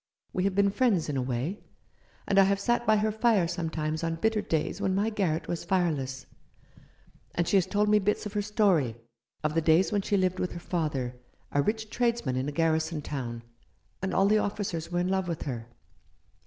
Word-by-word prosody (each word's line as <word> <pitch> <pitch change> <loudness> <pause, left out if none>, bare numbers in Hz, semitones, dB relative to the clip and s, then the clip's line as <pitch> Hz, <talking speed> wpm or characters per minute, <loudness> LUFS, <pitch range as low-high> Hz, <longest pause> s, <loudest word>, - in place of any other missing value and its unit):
We 185 - 0
have 195 -1 0
been 200 0 +4
friends 200 -9 +2
in 145 - -2
a 130 - 0
way; 130 - -2 0.7
and 195 - +4
I - - +8
have 195 0 +1
sat 240 +3 0
by 215 0 +5
her 215 +1 +1
fire 220 -5 +3
sometimes 160 -2 -2
on 165 0 0
bitter 220 +5 +1
days 160 +4 -2
when 190 -2 +1
my 210 +3 +1
garret 180 -7 -1
was 170 - -3
fireless, 150 -8 -1 1.1
and 170 -1 +1
she - - +2
has 185 - +2
told 210 0 +1
me 210 0 +5
bits 210 +2 0
of 210 - -5
her 210 - 0
story— 195 - +2 0.5
of 150 0 0
the 165 - +2
days 160 +5 +4
when 205 -1 +1
she 200 +1 +1
lived 185 -1 +1
with 180 - -2
her 170 - -6
father, 145 -8 -2 0.3
a 145 - +2
rich 220 +5 -2
tradesman 235 - 0
in 130 +2 -1
a - - -4
garrison 160 0 0
town, 120 -5 -5 0.6
and 190 - -1
all 195 - +3
the 215 +2 +4
officers 190 -6 -3
were 175 0 +1
in 180 - 0
love 190 -1 0
with 170 -3 -3
her. 120 -5 -5
180 Hz, 210 wpm, -28 LUFS, 155-205 Hz, 1.1 s, I